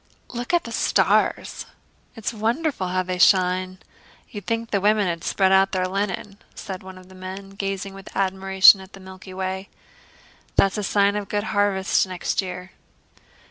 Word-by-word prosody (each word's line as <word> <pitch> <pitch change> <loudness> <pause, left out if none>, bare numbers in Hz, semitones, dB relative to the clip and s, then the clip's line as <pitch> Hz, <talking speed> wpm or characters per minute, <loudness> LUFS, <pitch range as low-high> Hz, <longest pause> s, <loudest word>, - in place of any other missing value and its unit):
"Look 245 +5 -4
at 350 0 +2
the - - -8
stars. - - +1 0.5
It's 225 0 -4
wonderful 230 - -1
how 185 +1 0
they 180 0 -4
shine! 185 0 +3 0.5
You 210 - -5
would 195 - -20
think 230 0 -2
the 200 - +1
women 210 0 +3
had 170 -2 -3
spread 190 -1 +2
out 195 +1 +4
their 185 -1 0
linen," 195 +1 -3 0.2
said 190 -2 -7
one 190 0 -11
of 185 0 -14
the 190 - -16
men, 190 +1 -8
gazing 195 0 -4
with 195 0 -11
admiration 190 0 +5
at 190 +1 -14
the 195 - -11
Milky 190 0 -11
Way. 190 +1 -4 0.9
"That's 195 +2 +3
a - - -3
sign 200 0 +2
of 210 - -1
a - - -29
good 205 0 -1
harvest 200 -2 +2
next 185 +1 -2
year." 180 0 -7
195 Hz, 180 wpm, -23 LUFS, 185-205 Hz, 0.9 s, admiration